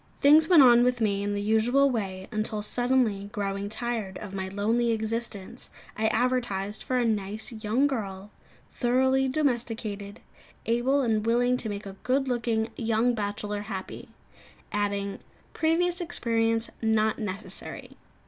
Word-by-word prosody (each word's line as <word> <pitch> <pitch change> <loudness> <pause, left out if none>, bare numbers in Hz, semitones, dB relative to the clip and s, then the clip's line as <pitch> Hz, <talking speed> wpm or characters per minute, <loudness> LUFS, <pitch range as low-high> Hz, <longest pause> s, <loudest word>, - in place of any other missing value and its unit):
Things 305 +3 +6
went 340 -6 +8
on 240 -1 +7
with 250 0 +1
me 200 -3 +1
in 205 0 -1
the 205 - -2
usual 240 +6 +3
way 190 -5 -3
until, 215 -1 -2
suddenly 240 -4 +1
growing 200 -1 -3
tired 220 -3 -3
of 195 - -8
my 190 -1 -3
lonely 220 +5 0
existence, 220 -2 -4 0.3
I 220 0 +1
advertised 220 -4 0
for 255 - -1
"a 245 - +2
nice 215 0 -2
young 225 +4 0
girl, 205 -7 -3 0.4
thoroughly 260 +2 +2
domesticated, 230 -7 -2 0.5
able 240 +5 +2
and 220 -3 +1
willing 245 +2 +2
to 225 - -4
make 205 0 -5
a 195 -1 -9
good 270 +2 +1
looking 230 -2 0
young 230 +1 +1
bachelor 205 -1 -3
happy;" 195 -2 -7 0.6
adding, 200 -1 -2 0.3
"Previous 345 +2 +1
experience 230 -8 0
not 220 -1 +2
necessary." 205 -1 -6
225 Hz, 140 wpm, -27 LUFS, 205-245 Hz, 0.6 s, went